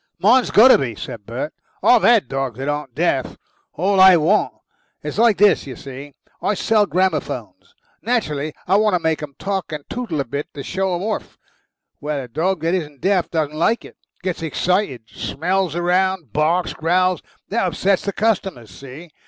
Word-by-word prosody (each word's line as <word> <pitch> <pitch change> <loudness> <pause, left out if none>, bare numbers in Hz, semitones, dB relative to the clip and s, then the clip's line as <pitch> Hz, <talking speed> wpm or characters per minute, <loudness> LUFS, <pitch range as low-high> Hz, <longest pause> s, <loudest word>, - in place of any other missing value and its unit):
"Mine's 235 +8 +4
got 230 +5 +7
to - - +7
be," 120 -5 -3
said 105 0 -8
Bert. 125 +7 -4 0.3
"I've 245 -2 +6
HAD 235 -4 +4
dogs 135 -3 -3
that 135 +1 -4
aren't 145 0 -3
deaf. - - 0 0.4
All 195 +3 +1
I 190 -1 +8
want. 170 +7 +2 0.5
It's - - -4
like 230 -3 +4
this, 205 -7 +4
you 130 - -7
see 135 +2 -10 0.3
I 210 - 0
sell 210 +1 +2
gramophones. 130 - -2 0.3
Naturally 155 -11 -1 0.2
I 190 +3 +4
got 210 -4 +3
to - - -6
make 160 -1 -1
'em 145 -2 -8
talk 195 -3 -3
and 150 -2 -6
tootle 235 -11 -3
a 140 - -1
bit 140 +5 -4
to 140 - -6
show 190 +2 -1
'em 175 - -4
orf. 215 +1 -4 0.6
Well, 150 -1 -3
a 130 - -6
dog 170 +8 -1
that 165 +2 0
isn't 150 -7 -4
deaf 190 -2 +1
doesn't 155 -3 -1
like 170 +9 0
it - - -14 0.3
gets 185 -3 -3
excited, 165 - -1
smells 180 +6 -2
round, 180 - 0
barks, 165 +4 +1
growls. 180 +3 +1 0.3
That 210 -2 0
upsets 185 +3 +1
the 200 - -2
customer. 195 - -1
See? 135 - -12
175 Hz, 180 wpm, -20 LUFS, 145-195 Hz, 0.6 s, I